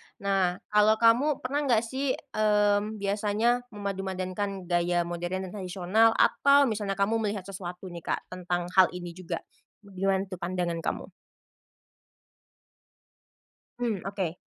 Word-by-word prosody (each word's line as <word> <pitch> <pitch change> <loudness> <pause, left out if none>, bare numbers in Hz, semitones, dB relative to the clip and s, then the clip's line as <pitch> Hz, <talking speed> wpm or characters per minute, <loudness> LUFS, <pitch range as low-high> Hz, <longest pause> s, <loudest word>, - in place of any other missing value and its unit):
nah 195 -3 +1 0.2
kalo 210 +1 +5
kamu 240 +6 +3
pernah 285 +2 -1
gak 230 -2 +3
sih, 265 +3 -1
mmm, 210 -3 +1
biasanya 210 +4 +1
memadumadankan 195 -1 -3
gaya 175 0 +1
modern 175 +2 -3
dan 180 - -9
tradisional 190 +5 +2
atau 280 0 +5
misalnya 205 -2 -2
kamu 220 +3 +2
melihat 205 -3 -2
sesuatu 180 -1 -7
nih 170 - -7 0.2
Kak - - -15
tentang 180 -1 -2 0.2
hal 185 - +8
ini 175 -1 -6
juga? 180 0 -6 0.4
Gimana 195 0 0
tuh 185 - -6
pandangan 175 -1 -2
kamu? - - -3 2.7
Mhm, 220 -7 -1
Oke. 190 -4 -3
195 Hz, 125 wpm, -28 LUFS, 180-215 Hz, 2.7 s, hal